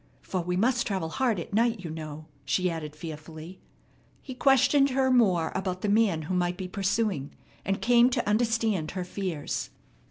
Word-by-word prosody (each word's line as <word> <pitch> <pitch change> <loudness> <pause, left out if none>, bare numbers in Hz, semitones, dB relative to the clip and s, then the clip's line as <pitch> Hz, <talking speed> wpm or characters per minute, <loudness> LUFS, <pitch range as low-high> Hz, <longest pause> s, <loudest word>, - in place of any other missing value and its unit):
"For 185 - -2
we 180 +1 -2
must 240 +4 +2
travel 190 -6 -2
hard 235 0 0
at 170 - -7
night, 230 -1 +2
you 165 -3 -6
know," 155 -1 -7 0.2
she 185 -1 0
added 155 -2 -6
fearfully. 160 +2 -9 0.6
He 265 - -8
questioned 275 +2 +4
her 260 0 +2
more 190 -10 +3
about 185 -1 -3
the 210 - -1
man 200 -7 +2
who 160 - -4
might 180 0 0
be 185 - -5
pursuing, 195 -6 -1 0.3
and 195 0 -2
came 240 +1 +5
to 250 - -1
understand 220 -5 +1
her 185 - -1
fears. 180 -5 -4
190 Hz, 170 wpm, -27 LUFS, 165-230 Hz, 0.6 s, came